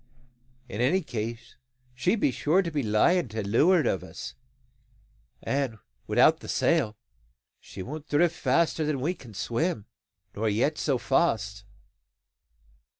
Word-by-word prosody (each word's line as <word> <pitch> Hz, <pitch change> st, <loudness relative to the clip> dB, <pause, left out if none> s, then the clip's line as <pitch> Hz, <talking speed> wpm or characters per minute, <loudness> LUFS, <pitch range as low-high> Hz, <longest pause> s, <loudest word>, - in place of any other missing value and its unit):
In 110 Hz, -1 st, -4 dB
any 165 Hz, +10 st, +3 dB
case 115 Hz, -2 st, -6 dB, 0.4 s
she 155 Hz, -, +1 dB
be 200 Hz, -, +1 dB
sure 160 Hz, +9 st, +2 dB
to 170 Hz, -, -4 dB
be 150 Hz, -2 st, 0 dB
lying 130 Hz, +10 st, +3 dB
to 110 Hz, -1 st, -4 dB
leuart 150 Hz, -, +4 dB
o' -, -, +2 dB
us; -, -, -8 dB, 1.1 s
and, 135 Hz, -5 st, -1 dB, 0.3 s
without -, -, +4 dB
the -, -, -11 dB
sail, 105 Hz, 0 st, +1 dB, 0.6 s
she 95 Hz, -, -9 dB
won't 150 Hz, +5 st, -7 dB
drift 170 Hz, +3 st, +3 dB
faster 170 Hz, -2 st, +1 dB
than 150 Hz, -2 st, -1 dB
we 155 Hz, +8 st, 0 dB
can 120 Hz, -, -14 dB
swim, 120 Hz, -, -1 dB, 0.5 s
nor 110 Hz, +1 st, 0 dB
yet 125 Hz, +9 st, +1 dB
so 140 Hz, -4 st, +1 dB
fast. 110 Hz, -8 st, 0 dB
135 Hz, 135 wpm, -27 LUFS, 110-160 Hz, 1.1 s, leuart